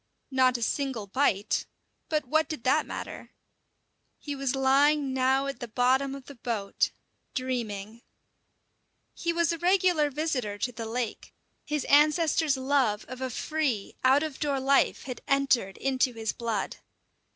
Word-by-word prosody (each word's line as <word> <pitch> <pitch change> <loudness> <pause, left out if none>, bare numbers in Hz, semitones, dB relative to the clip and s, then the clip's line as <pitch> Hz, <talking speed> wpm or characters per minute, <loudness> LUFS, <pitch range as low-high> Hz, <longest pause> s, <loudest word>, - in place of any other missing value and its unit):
Not 255 -1 +3
a 235 - -3
single 265 -5 -1
bite. 205 -2 0 0.4
But 305 -3 0
what 315 +5 +1
did 305 -7 -5
that 300 +4 +2
matter? - - -7 0.9
He 290 -1 -5
was 275 -1 -1
lying 275 +1 +3
now 265 +1 +2
at 275 0 -4
the 240 - -5
bottom 260 +4 +1
of 275 -2 -10
the 280 - -10
boat, 225 -5 -1 0.5
dreaming. 230 -4 -3 1.1
He 340 - -1
was 335 -1 +1
a 335 - -3
regular 355 -4 +3
visitor 265 -8 -2
to 245 +5 -2
the 230 -1 -6
lake. 235 0 -4 0.3
His 300 -2 -1
ancestors' 305 0 +4
love 260 -6 +1
of 255 +1 -8
a 260 - -1
free, 265 -5 -2
out 265 +3 +5
of 310 -4 -5
door 280 -2 0
life 275 +1 +2
had 255 -2 -6
entered 270 -8 +2
into 260 -1 +1
his 225 -2 -3
blood. 230 -4 -3
265 Hz, 150 wpm, -28 LUFS, 240-290 Hz, 1.1 s, out